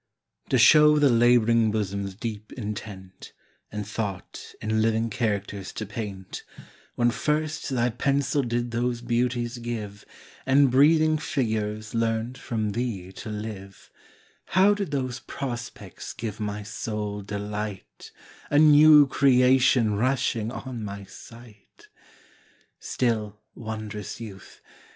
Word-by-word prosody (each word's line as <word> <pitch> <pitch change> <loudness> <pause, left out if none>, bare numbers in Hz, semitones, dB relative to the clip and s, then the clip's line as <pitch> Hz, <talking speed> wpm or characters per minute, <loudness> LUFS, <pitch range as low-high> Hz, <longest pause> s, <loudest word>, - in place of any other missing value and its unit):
TO 130 - +3
show 150 +4 +7
the 145 -3 +4
lab'ring 115 -1 +4
bosom's 100 -2 -3
deep 110 -1 -6
intent, 105 -4 -8 0.4
And 105 -1 -5
thought 105 -4 -6
in 110 0 0
living 115 0 +1
characters 100 -4 -2
to 110 - -5
paint, 100 -3 -7 0.5
When 120 0 +2
first 150 +5 -2
thy 125 -2 +1
pencil 140 +4 0
did 120 -1 -2
those 120 0 -1
beauties 120 0 -1
give, 110 -4 -6 0.4
And 135 0 +4
breathing 155 +3 +4
figures 110 -6 -2
learnt 115 +1 -1
from 110 -3 -2
thee 105 -5 -4
to 110 - -8
live, 105 -2 -8 0.5
How 190 +3 +4
did 200 -4 -3
those 130 -3 -3
prospects 120 -7 -7
give 115 -3 -6
my 105 0 -4
soul 105 0 -4
delight, 105 0 -6 0.4
A 145 - +2
new 150 0 +8
creation 125 -4 +4
rushing 120 -2 0
on 125 -3 -6
my 100 -1 -6
sight? 115 +1 -15 0.9
Still, 110 -4 -2 0.2
wond'rous 110 -3 -6
youth! 100 -5 -11
115 Hz, 115 wpm, -25 LUFS, 105-125 Hz, 0.9 s, new